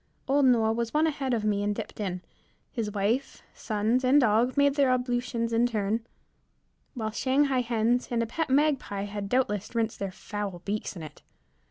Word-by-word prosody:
Old 280 +1 +3
Noah 230 -3 +4
was 235 +3 -3
one 310 +1 +4
ahead 280 -4 -1
of 225 -3 0
me 205 -1 +1
and 205 0 0
dipped - - -7
in. 185 -3 -3 0.5
His 230 -5 -2
wife, 210 +6 -1
sons, 220 +4 0
and 260 +3 +5
dog 240 +2 +2
made 285 -1 +4
their 280 -2 +3
ablutions 245 -2 -1
in 235 +1 +3
turn, 220 0 -1 0.9
while 220 -3 -3
the - - -16
Shanghai 265 0 +2
hens 240 +1 +1
and 235 -1 0
a - - -1
pet 310 +7 -3
magpie 270 -8 +1
had 205 -1 -5
doubtless 210 -4 0
rinsed 225 -1 -1
their 195 - -2
fowl 195 -2 -6
beaks 210 0 -3
in 170 - -7
it. 155 -1 -11
230 Hz, 185 wpm, -27 LUFS, 210-255 Hz, 0.9 s, and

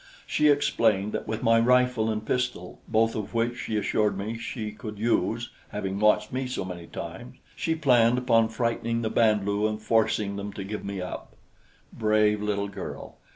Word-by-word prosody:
She 150 - +2
explained 110 -8 +2
that - - -4
with 110 +2 -3
my 115 -1 +5
rifle 125 -1 +3
and 110 0 -2
pistol 125 -9 -2
both 115 0 +2
of 110 +1 -5
which 115 +1 +1
she 110 - -3
assured 105 -1 +1
me 105 +4 -3
she 115 -1 -5
could 105 -2 -8
use, 115 +1 0 0.2
having 100 -1 -3
watched 105 +1 +3
me 130 0 -1
so 125 -7 -3
many 85 -2 -7
times - - -8 0.2
she 160 - -1
planned 125 -6 +4
upon 115 -3 +3
frightening 115 0 -1
the 110 - -1
Band 110 -3 +3
lu 100 +1 +1
and 105 0 -3
forcing 110 -2 +1
them 100 0 -5
to 100 - -5
give 105 +2 -5
me 100 -1 -4
up. 90 - -7 0.6
Brave 105 -1 +2
little 100 -1 -1
girl! 100 -1 -8
110 Hz, 180 wpm, -26 LUFS, 105-115 Hz, 0.6 s, my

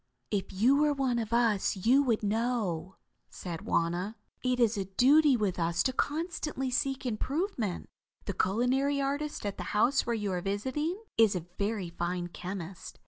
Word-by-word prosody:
"If 200 -2 -1
you 240 +9 +4
were 300 0 +3
one 260 -4 0
of 220 -1 -4
us 230 -5 +2
you 240 +9 +4
would 235 -6 +1
know," 210 -5 -1 0.3
said 170 -3 -6
Wauna. 175 +6 0 0.3
"It 255 -1 +1
is 235 -2 +3
a 195 -2 -2
duty 270 +8 +5
with 200 -5 -1
us 170 0 +1
to 260 - 0
constantly 300 -3 -2
seek 270 +1 -1
improvement. 250 - -2 0.4
The 200 - -2
culinary 250 +10 +1
artist 285 -1 -2
at 200 - -3
the - - -4
house 250 +6 +4
where 235 - +1
you 210 -3 -2
are 180 -1 -1
visiting, 265 - -2 0.2
is 220 -3 +5
a 175 -2 -3
very 200 -4 -1
fine 175 +1 -3
chemist. 180 0 -7
225 Hz, 165 wpm, -30 LUFS, 190-270 Hz, 0.4 s, duty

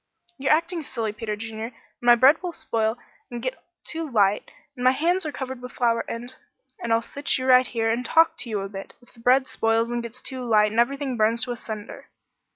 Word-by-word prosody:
"You're 270 - +1
acting 330 +2 +2
silly, 225 -7 -3
Peter 215 -1 -4
Junior, 220 +1 -6
and 235 - -8 0.3
my 240 0 +7
bread 265 +6 +5
will 365 - -3
all - - -3
spoil 220 -4 -1 0.3
and 240 - -5
get 255 +2 -4 0.2
too 320 -1 -4
light, 205 -4 +2 0.2
and 250 - -6
my 255 +1 +6
hands 345 +4 +1
are - - -1
all - - -9
covered 260 -1 -5
with 250 0 -8
flour, 230 -2 +1
and 240 +2 -6 0.2
" 260 -1 -31
"And 235 - -3
you'll 230 0 +3
sit 285 +1 -7
right 255 -1 +5
here 225 -1 0
while 230 - 0
I - - -3
talk 325 +5 +4
to 240 - -5
you 210 -3 -1
a 195 - -5
bit, 195 -1 -9
if 245 - -22
the 235 - -19
bread 255 +3 +4
spoils 225 +1 +1
and 240 0 -1
gets 235 +2 -8
too 260 -2 -5
light 215 -3 +3
and 225 - 0
everything 270 +1 +1
burns 220 +1 +2
to 245 - -4
a - - -2
cinder." 215 -3 -8
240 Hz, 245 wpm, -25 LUFS, 225-265 Hz, 0.3 s, my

